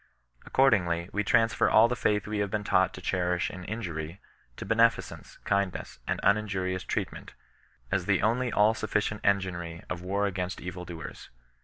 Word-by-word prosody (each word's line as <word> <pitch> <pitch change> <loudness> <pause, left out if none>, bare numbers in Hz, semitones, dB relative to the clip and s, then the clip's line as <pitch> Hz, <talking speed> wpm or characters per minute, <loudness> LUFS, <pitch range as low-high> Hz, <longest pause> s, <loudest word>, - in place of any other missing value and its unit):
Accordingly 90 -10 +2
we 105 - 0
transfer 115 +1 +3
all 110 +2 +6
the 125 - -1
fttith 105 -5 +1
we 105 -1 -3
have 100 -1 0
been 105 +1 -2
taught - - +3
to - - -9
cherish 90 -1 0
in 90 - -8
injuiry, 85 -6 -5 0.4
to - - -6
beneficence, 115 -4 +1
kindness, 100 -2 -1
and - - -1
uninjurious 95 -3 +1
treat - - -2
ment, - - -11 0.6
as - - 0
the - - +2
only 120 +3 +1
all 105 +2 +4
sufficient 110 -1 -1
enginery 90 -4 -1
of 90 - -3
war 100 +3 0
against 95 -2 -3
enL 90 -1 -7
doers. 80 -3 -8
100 Hz, 165 wpm, -28 LUFS, 90-110 Hz, 0.6 s, all